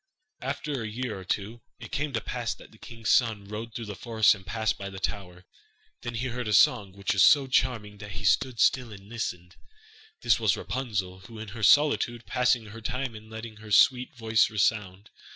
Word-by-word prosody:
After 140 0 -3
a 110 - -3
year 115 -2 -4
or - - -9
two, 105 +5 -3 0.2
it - - -10
came 145 +1 -1
to 115 - -1
pass 120 +1 -3
that - - -16
the 110 - -19
king's 115 -2 -3
son 110 -5 +2
rode 110 +2 -7
through 115 - -4
the 105 -1 -6
forest 110 0 +3
and 100 -2 -10
passed 110 +3 -1
by 100 - -6
the 95 - -9
tower. 90 -2 -5 0.6
Then 120 -1 -5
he 130 +3 -2
heard 120 -1 -4
a 105 - 0
song, 100 -1 +4
which 100 0 -1
was - - +5
so 140 -2 +6
charming 115 -6 0
that 105 0 -8
he - - -6
stood 125 -3 +2
still 125 -4 +3
and 100 -1 -12
listened. 90 -6 -5 0.7
This - - +4
was - - +2
Rapunzel, 100 -8 -3
who 115 - -11
in 110 -1 -7
her 110 +3 -8
solitude 120 -2 +4
passed 125 0 +3
her 115 0 -11
time 125 +2 -3
in 110 0 -12
letting 110 0 -8
her 110 0 -12
sweet 125 +5 +4
voice 115 -1 +2
resound. 105 -2 -1
110 Hz, 205 wpm, -27 LUFS, 105-120 Hz, 0.7 s, so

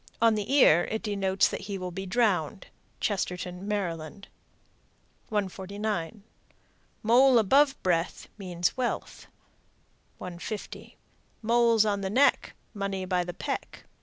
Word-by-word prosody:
On 230 0 +5
the 210 +2 -3
ear 175 - +6
it 220 - -4
denotes 195 -2 +1
that - - -5
he 200 - -3
will 185 -1 -5
be 190 +2 -6
drowned. 190 -4 0 0.3
Chestertown, 180 -2 -3
Md. 190 -2 -4 1.0
149. 200 -1 -3 0.8
Mole 250 +3 +5
above 270 +6 +4
breath 175 -2 -1
Means 180 -4 -2
wealth. 255 -2 -4 0.9
150. 180 +4 -7 0.5
Moles 230 -1 +4
on 200 -1 0
the 190 - -2
neck, 260 +8 +2 0.2
Money 200 -2 -3
by 180 -1 0
the 175 -1 -7
peck. - - -5
200 Hz, 115 wpm, -28 LUFS, 180-220 Hz, 1.0 s, ear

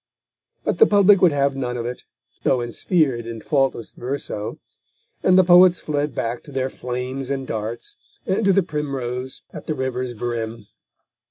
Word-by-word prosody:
But - - -1
the 450 - +8
public 200 -1 +5
would 180 - +6
have 140 -1 +1
none 125 -2 -3
of 115 - -4
it, 125 +1 -6 0.4
though - - +2
ensphered 120 - 0
in 115 -1 -6
faultless 135 -3 0
verso, 120 -5 -4 0.6
and 185 0 +4
the 185 - +7
poets 180 0 +7
fled 145 -3 -2
back 115 +1 -2
to 145 - -11
their 130 -1 -2
flames 125 +2 -4
and 135 -1 -2
darts, 115 - -5 0.3
and 195 +4 0
to 195 - +5
the 195 0 +3
primrose 130 -5 -4
at - - -9
the 155 - -1
river's 130 -2 -3
brim. 115 -1 -4
130 Hz, 165 wpm, -22 LUFS, 120-155 Hz, 0.6 s, the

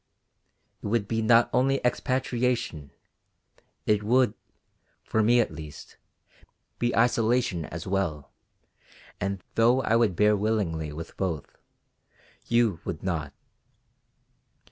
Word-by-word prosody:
It - - -5
would 105 -1 0
be 110 0 -1
not 115 +2 +5
only 135 +1 +2
expatriation; 125 - -1 1.0
it 105 -1 +2
would, 120 +1 +3 0.7
for 110 - 0
me 120 +3 +4
at 115 - +1
least, 75 -2 -10 0.8
be 120 0 0
isolation 115 -6 +2
as 80 +2 -7
well, 85 -7 -2 0.9
and, 100 -1 -3
though 120 +3 +3
I 115 - +2
would 115 -6 +3
bear 105 +3 +4
willingly 95 -8 -1
with 80 +2 -8
both, 85 -6 -3 0.9
you 115 -7 +2
would 85 -5 -5
not. 80 -6 -2
105 Hz, 110 wpm, -27 LUFS, 85-120 Hz, 1.0 s, not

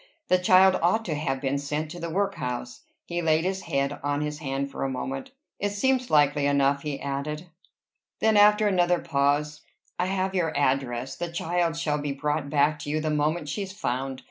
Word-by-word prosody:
"That 185 0 +3
child 185 +1 +6
ought 220 +7 +2
to 165 - -2
have 145 -3 -2
been 140 0 0
sent 150 +2 -3
to 175 - -7
the 170 0 -4
workhouse." 125 -10 -3 0.2
He 175 0 -3
laid 160 0 +2
his 190 +1 -1
head 140 -2 -1
on 145 0 -1
his 150 0 -3
hand 140 -1 -3
for - - -4
a 135 - 0
moment. 135 +1 -4 0.3
"It 205 0 -1
seems 255 +4 +1
likely 145 -1 +3
enough," 140 0 +2
he 145 -2 -4
added. 140 +4 -4 0.7
Then 220 -1 +3
after 210 +1 +6
another 180 -2 +3
pause 150 -1 0 0.4
"I 180 - +1
have 190 0 -1
your 165 -5 0
address. 130 -2 0
The 175 -1 -4
child 170 0 -1
shall 150 -3 0
be 145 -1 -2
brought 145 0 -2
back 150 +1 +2
to 145 - -6
you 155 +1 0
the 155 0 -1
moment 150 +2 0
she's 190 +5 -4
found. 130 -5 -3
150 Hz, 195 wpm, -26 LUFS, 140-175 Hz, 0.7 s, child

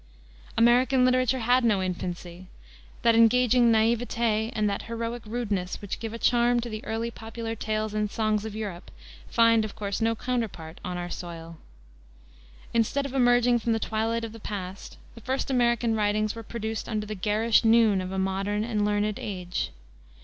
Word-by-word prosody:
American 250 +3 +4
literature 255 0 +2
had 245 +2 +3
no 215 -4 +3
infancy. 180 -1 -5 0.6
That 230 - +5
engaging 240 +1 +5
naïveté 225 0 +1
and 215 -2 +1
that 200 -1 -1
heroic 230 +1 -4
rudeness 210 -6 -2
which 205 - -5
give 225 -1 -5
a 230 - -5
charm 240 +1 +3
to 240 - -5
the 215 -1 -6
early 230 +1 -2
popular 225 0 -6
tales 215 -1 -2
and 210 -1 0
songs 215 -1 0
of 220 -1 -6
Europe 200 -5 -6 0.4
find, 230 -1 +4
of 215 - -6
course, 200 +1 -3
no 225 0 +2
counterpart 215 -10 -4
on 180 -1 -4
our 175 0 -5
soil. 165 -2 -8 1.1
Instead 235 +5 +1
of 275 - -6
emerging 245 -2 +4
from 230 0 0
the 225 - 0
twilight 225 +1 -1
of 225 - -5
the 225 - -10
past, 195 -2 -7 0.2
the 230 - -13
first 265 +3 -2
American 240 -2 +2
writings 215 0 +1
were 230 - -7
produced 220 0 -5
under 215 -2 -2
the 215 - -5
garish 215 +4 +2
noon 225 -4 +4
of 185 0 -5
a 190 - -3
modern 195 +2 -1
and 220 -2 -1
learned 210 0 0
age. 180 -3 -3
220 Hz, 170 wpm, -26 LUFS, 205-235 Hz, 1.1 s, That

